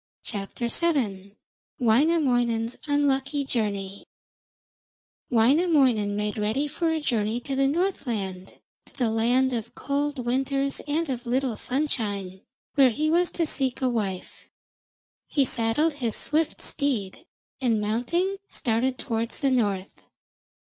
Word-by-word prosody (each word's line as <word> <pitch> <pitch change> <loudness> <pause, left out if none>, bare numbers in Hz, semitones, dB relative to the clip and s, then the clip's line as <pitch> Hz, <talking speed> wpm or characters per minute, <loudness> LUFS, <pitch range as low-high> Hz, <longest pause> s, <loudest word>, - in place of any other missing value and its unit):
WAINAMOINEN'S 245 -3 +2
UNLUCKY 285 0 +1
JOURNEY 200 -5 -2 1.2
Wainamoinen 250 - +3
made 210 +1 -2
ready 220 +8 0
for 325 +3 -1
a 320 0 0
journey 230 -5 0
to 275 +2 -3
the 270 0 +3
Northland, 235 - -2 0.3
to - - -20
the 240 -4 +1
land 245 +4 +2
of 230 0 -4
cold 285 +1 -1
winters 275 +2 0
and 320 +3 0
of 250 -2 -4
little 255 -1 0
sunshine, 205 -10 -2 0.3
where 275 -3 +6
he 305 +6 0
was 350 +1 +3
to 335 - -1
seek 265 -4 0
a 255 - +3
wife. 200 -6 -4 0.8
He 280 -3 +2
saddled 250 +7 +2
his 245 -6 -2
swift 310 +1 0
steed, 265 - -2 0.3
and 235 -4 +2
mounting, 250 - 0
started 250 +2 0
towards 230 -2 -3
the 275 -3 +1
north. 205 -6 -1
255 Hz, 115 wpm, -26 LUFS, 225-285 Hz, 1.2 s, where